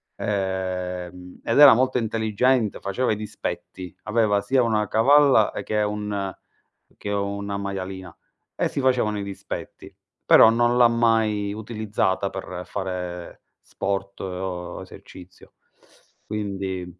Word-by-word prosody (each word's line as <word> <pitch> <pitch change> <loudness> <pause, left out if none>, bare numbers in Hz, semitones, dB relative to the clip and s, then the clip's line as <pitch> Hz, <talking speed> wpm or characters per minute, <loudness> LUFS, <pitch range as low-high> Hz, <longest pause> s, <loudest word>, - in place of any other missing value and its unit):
ehm, 90 -2 -4
ed 115 +5 +1
era 145 -4 +10
molto 130 0 +1
intelligente, 110 +1 +1
faceva 110 +5 -1
i - - +1
dispetti. 90 -4 -6
Aveva 105 -2 +2
sia 125 +5 +2
una 110 -2 +1
cavalla 135 0 +5
e - - -4
che 105 0 -1
un 105 -2 -3 0.6
che 105 - -6
una 100 0 -2
maialina, 95 -3 -6 0.4
e - - 0
si - - -4
facevano 120 -5 +1
i - - -3
dispetti. 100 -1 -8 0.3
Però - - +8
non 120 +1 +2
l'ha 120 -1 +7
mai 110 -3 +1
utilizzata 105 -3 -2
per 95 -2 -6
fare 90 -3 -5 0.2
sport 100 0 -4
o 90 -2 -5
esercizio. 90 0 -14 0.7
Quindi 95 -3 -4
100 Hz, 120 wpm, -24 LUFS, 95-110 Hz, 0.7 s, era